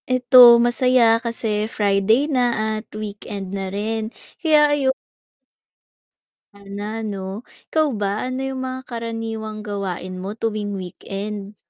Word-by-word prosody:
Eto 250 -1 +8
masaya 240 -1 +3
kasi 220 -3 -2
Friday 205 +6 +2
na 275 -4 0 0.4
at - - -27
weekend 205 -2 -6
na 195 -1 -3
rin. 220 +3 -3 0.3
Kaya 300 -3 +4
ayu 275 -2 +2 1.6
Sana 200 +1 -7 0.2
'no. 195 -2 -5 0.4
Ikaw 315 -1 +3
ba? 205 -2 -1 0.2
Ano 255 +1 -3
yung 265 -1 -3
mga 255 0 -4
karaniwang 225 -2 -5
gawain 185 -3 -5
mo 195 +3 -5
tuwing 215 -2 -3
weekend? 200 +2 -6
215 Hz, 120 wpm, -21 LUFS, 200-245 Hz, 1.6 s, Eto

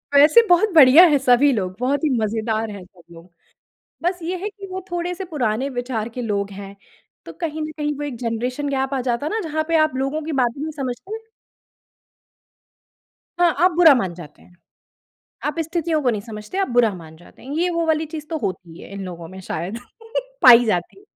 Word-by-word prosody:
वैसे 300 +11 +7
बहुत 355 +5 +4
बढ़िया 295 +3 +9
है 295 -3 +3
सभी 265 +2 +4
लोग, 185 -4 -3
बहुत 280 +5 0
ही 305 - +2
मज़ेदार 220 0 -1
हैं 200 -2 -9
सब 180 -2 -22
लोग। 170 +2 -14 0.7
बस 355 +1 0
ये 360 +3 -3
है 415 - -2
कि 400 -1 -11
वो 375 0 -6
थोड़े-से 350 +2 -3
पुराने 265 -6 -2
विचार 245 -3 -3
के 245 +1 -6
लोग 200 -2 -2
हैं। 200 0 -9 0.5
तो - - -9
कहीं 315 -2 -5
न 310 - -4
कहीं 295 -1 -2
वो - - -5
एक 275 -5 -5
जेनरेशन 250 +4 -3
गैप 270 0 -1
आ 260 - -1
जाता 240 +6 -1
ना 440 +1 -2
जहाँ 310 +1 -1
पे 330 - +2
आप 310 -4 +2
लोगों 275 +4 -2
की 315 +1 -5
बातें 255 0 0
नहीं 315 - -3
समझते? 275 - -5 2.2
हाँ, 350 -2 +3
आप 360 +1 +4
बुरा 330 -3 +7
मान 190 -7 -1
जाते 155 -4 -13
हैं। 180 - -21 0.9
आप 300 +2 -2
स्थितियों 325 -1 -1
को 250 - +3
नहीं 210 -3 -2
समझते, 215 - -8
आप 390 - +1
बुरा 240 -4 +3
मान 160 -2 -12
जाते 175 - -19
हैं। 270 - -9
ये 355 +2 +1
वो 335 -1 -1
वाली 315 0 +1
चीज़ 305 -1 -6
तो 320 - -2
होती 180 - -6
है - - -12
इन 200 -1 -6
लोगों 170 -2 -8
में 190 +2 -11
शायद, 180 +5 -5 0.6
पाई 245 -1 +8
जाती। 210 - -2
265 Hz, 200 wpm, -21 LUFS, 215-320 Hz, 2.2 s, बढ़िया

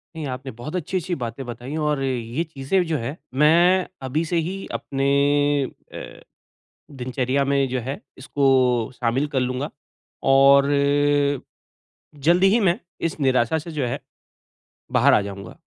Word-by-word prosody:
नहीं, 160 -2 -5
आपने 130 +1 -6
बहुत 120 +9 -8
अच्छी-अच्छी 180 +1 -2
बातें 120 0 -5
बताई 125 +4 -7
और 145 -2 0
ये 125 +3 -2
चीज़ें 160 +4 -1
जो 160 -2 0
हैं, 130 +5 -4 0.2
मैं 170 +6 +4 0.2
अभी 155 +6 0
से 170 +1 -1
ही 195 +1 -5
अपने 135 0 -3 0.9
अ, - - -9 0.7
दिनचर्या 130 +1 -1
में 140 -1 +1
जो 130 0 -1
है 135 - -4 0.2
इसको 130 -4 +2
शामिल 125 +4 0
कर - - +3
लूँगा 130 +3 -2 0.6
और, 140 +1 +6 1.5
जल्दी 170 +6 +3
ही 225 +3 +3
मैं 180 -1 +2 0.3
इस 160 - -9
निराशा 130 +2 +2
से 165 +2 -8
जो 140 -5 -1
है, 120 - -3 0.9
बाहर - - +4
आ - - +5
जाऊँगा। 100 -1 -8
135 Hz, 140 wpm, -22 LUFS, 125-160 Hz, 1.5 s, और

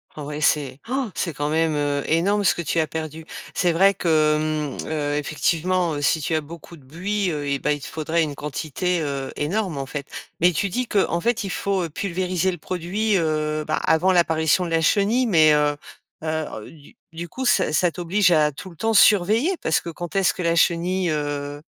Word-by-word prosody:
Ah 150 - -7
ouais, 150 +1 -5
c'est 140 -3 +1
han! 260 -2 -1
C'est 170 - -2
quand 145 +1 -2
même, 160 0 +1
heu, 145 -1 -1
énorme 195 +6 +2
ce 190 - +4
que 170 - -4
tu 165 +1 -1
as 160 - +2
perdu. 160 0 -6 0.3
C'est 175 -2 +2
vrai 195 +4 +4
que, 155 -2 +2
mmh, 155 -2 -3
heu, 145 -2 -2
effectivement, 165 +3 0
heu, 145 - -4
si 155 +2 +2
tu 160 - -1
as 155 - +1
beaucoup 170 +2 -11
de 145 - -19
buis, 185 +7 -2
heu 145 -2 -4
et 140 - 0
bah, 150 +2 -1
il 145 - -4
te - - -7
faudrait 160 +1 -1
une 150 -3 -2
quantité, 155 +5 -2
heu, 140 -3 -3
énorme, 180 +2 -2
en 135 -1 -4
fait. 140 0 -5 0.3
Mais 175 +2 +5
tu 200 +4 -1
dis 250 +7 -1
qu'en 190 -4 +1
fait, 235 +4 0
il 195 - -4
faut 190 -2 -1
pulvériser 185 +1 -1
le 175 - -7
produit, 190 +6 -1
heu, 155 -2 -1
bah, 155 - 0
avant 165 +4 +2
l'apparition 165 0 +2
de - - -4
la 165 0 +1
chenille, 210 +9 +2
mais 160 -8 +5
heu, 150 0 +3
heu, - - -7 0.5
ah, 160 -6 -3
heu, - - -11
du 150 -3 -17 0.2
du 170 +1 -6
coup, 260 +8 -5
ça 190 -9 +3
ça 175 +1 +2
t'oblige 180 +2 +1
à, 155 -2 +4
tout 170 +7 -10
le 170 - -15
temps, 225 +7 -1
surveiller 215 - +4
parce 160 - +1
que - - -7
quand 175 +2 -7
est-ce 195 -2 +3
que - - -5
la 170 0 +2
chenille, 175 +2 +1
heu, 145 -1 -3
165 Hz, 220 wpm, -23 LUFS, 150-185 Hz, 0.5 s, Mais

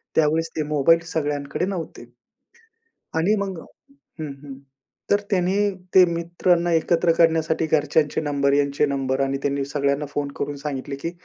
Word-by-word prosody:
त्यावेळेस 160 +1 +2
ते 155 - +1
मोबाईल 155 +3 +4
सगळ्यांकडे 145 +1 -2
नव्हते. 175 -10 -5 1.1
आणि 175 +7 +2
मग 195 -3 -3 0.6
हं, 155 -2 -4
हं. 140 -2 -8 0.6
तर 205 - +5
त्यांनी 185 0 +1 0.4
ते 185 - +9
मित्रांना 170 +1 +1
एकत्र 165 +1 +2
करण्यासाठी 160 -1 +2
घरच्यांचे 150 0 +1
नंबर, 140 -2 +1
यांचे 140 +1 +2
नंबर 135 -1 -1
आणि 135 0 0
त्यांनी 140 -1 0
सगळ्यांना 140 +1 -1
फोन 145 0 -2
करून 145 0 -2
सांगितले 140 -1 -5
की 165 +5 -5
150 Hz, 140 wpm, -23 LUFS, 140-165 Hz, 1.1 s, ते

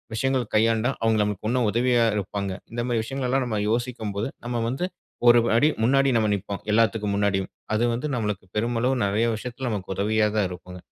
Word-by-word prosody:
விஷயங்கள் 130 -2 0
கையாண்டா, 115 +3 +3
அவங்க 115 -1 +2
நமக்கு 105 0 -3
இன்னும் 125 -2 +1
உதவியா 120 0 +3
இருப்பாங்க? 100 0 -3 0.2
இந்த 120 0 -3
மாரி 115 -2 +1
விஷயங்கள் 135 +1 -3
எல்லா 135 +1 +2
நம்ம 110 -3 -2
யோசிக்கும் 120 -3 -2
போது, 110 +6 -1 0.2
நம்ம 120 -1 -2
வந்து 135 +8 -2 0.4
ஒரு 120 0 +7 0.2
அடி 150 +5 +4
முன்னாடி 135 +3 +4
நம்ம 110 -1 +2
நிப்போம், 100 0 -5
எல்லாத்துக்கும் 110 -2 +2
முன்னாடியும். 100 -2 0 0.2
அது 115 - +1
வந்து 145 +6 -3
நம்மளுக்கு 105 -5 -2
பெருமளவு 120 +3 0
நெறைய 105 +4 +1
விஷயத்துல 125 +2 -5
நமக்கு 95 -2 -3
உதவியா 105 +2 +2
தான் 105 -3 +2
இருக்கும். 90 0 -9
115 Hz, 180 wpm, -25 LUFS, 105-125 Hz, 0.4 s, ஒரு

